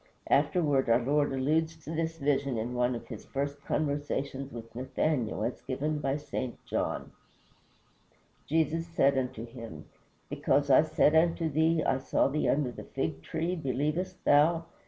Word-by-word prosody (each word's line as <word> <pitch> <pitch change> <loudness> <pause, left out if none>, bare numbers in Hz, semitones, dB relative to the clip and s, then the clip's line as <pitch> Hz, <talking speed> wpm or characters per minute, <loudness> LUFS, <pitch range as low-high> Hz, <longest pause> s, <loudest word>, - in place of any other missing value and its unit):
Afterward 145 -3 +3
our 115 - +6
Lord 145 +4 +1
alludes 155 +5 +1
to 155 - -6
this 165 0 -2
vision 140 -3 0
in 115 +3 -3
one 125 0 +1
of 115 - -7
his 110 -4 -8
first 140 +1 -4
conversations 140 -2 -2
with 115 -1 -9
Nathaniel, 130 -1 -1
as 120 - -3
given 150 +3 -2
by 135 -1 0
St. 130 -4 -4
John: - - -2 1.4
"Jesus 165 +2 +1
said 140 -4 +3
unto 125 -3 -2
him, 115 -10 -9 0.4
Because 140 +1 +1
I 130 - +8
said 155 -1 +3
unto 165 0 +3
thee, 160 +2 +2
I 130 - +1
saw 135 - +1
thee 150 +2 0
under 140 -3 +1
the - - -9
fig 80 0 -3
tree, 165 - -2
believest 150 +4 -2
thou? 165 +3 +4
140 Hz, 155 wpm, -30 LUFS, 130-155 Hz, 1.4 s, I